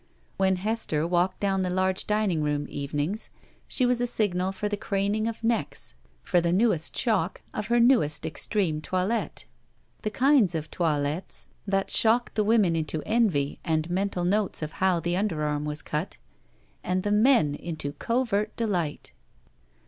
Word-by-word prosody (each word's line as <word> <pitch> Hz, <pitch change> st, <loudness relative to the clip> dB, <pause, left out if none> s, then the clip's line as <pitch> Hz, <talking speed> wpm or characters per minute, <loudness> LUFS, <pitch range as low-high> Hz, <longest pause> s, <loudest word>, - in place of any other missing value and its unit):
When 190 Hz, -1 st, +3 dB
Hester 185 Hz, -6 st, -1 dB
walked 175 Hz, +2 st, +1 dB
down 195 Hz, -1 st, +1 dB
the 185 Hz, -, -1 dB
large 185 Hz, +1 st, 0 dB
dining 210 Hz, -6 st, +1 dB
room 145 Hz, -1 st, -1 dB
evenings, 145 Hz, +8 st, -3 dB, 0.4 s
she 255 Hz, -, +1 dB
was 245 Hz, -1 st, +1 dB
a 245 Hz, -, +1 dB
signal 190 Hz, -5 st, 0 dB
for 200 Hz, +2 st, -3 dB
the 205 Hz, -, -1 dB
craning 205 Hz, +2 st, -1 dB
of 230 Hz, 0 st, -5 dB
necks 230 Hz, 0 st, -2 dB, 0.3 s
for 175 Hz, -2 st, +2 dB
the 170 Hz, 0 st, +1 dB
newest 185 Hz, -4 st, +1 dB
shock 200 Hz, -7 st, 0 dB
of 210 Hz, -, -3 dB
her 240 Hz, +1 st, +3 dB
newest 235 Hz, -, +3 dB
extreme 160 Hz, -1 st, 0 dB
toilette. 185 Hz, +7 st, -2 dB, 0.6 s
The 215 Hz, -, -1 dB
kinds 250 Hz, -, +3 dB
of 155 Hz, -1 st, -4 dB
toilettes 155 Hz, +1 st, -2 dB, 0.2 s
that 195 Hz, 0 st, 0 dB
shocked 235 Hz, +2 st, +3 dB
the 215 Hz, -, +1 dB
women 205 Hz, -6 st, +3 dB
into 155 Hz, -1 st, -2 dB
envy 195 Hz, -12 st, +1 dB
and 160 Hz, 0 st, -1 dB
mental 185 Hz, -1 st, -1 dB
notes 200 Hz, -2 st, +1 dB
of 155 Hz, -, -4 dB
how 185 Hz, -2 st, +3 dB
the 175 Hz, +1 st, -2 dB
underarm 150 Hz, -7 st, -1 dB
was 150 Hz, +1 st, -5 dB
cut, 150 Hz, +5 st, -3 dB, 0.7 s
and 185 Hz, +1 st, -1 dB
the 205 Hz, -, -1 dB
men 210 Hz, -, +4 dB
into 155 Hz, -2 st, -5 dB
covert 215 Hz, -, -1 dB
delight. 180 Hz, -10 st, -2 dB
190 Hz, 155 wpm, -26 LUFS, 160-215 Hz, 0.7 s, men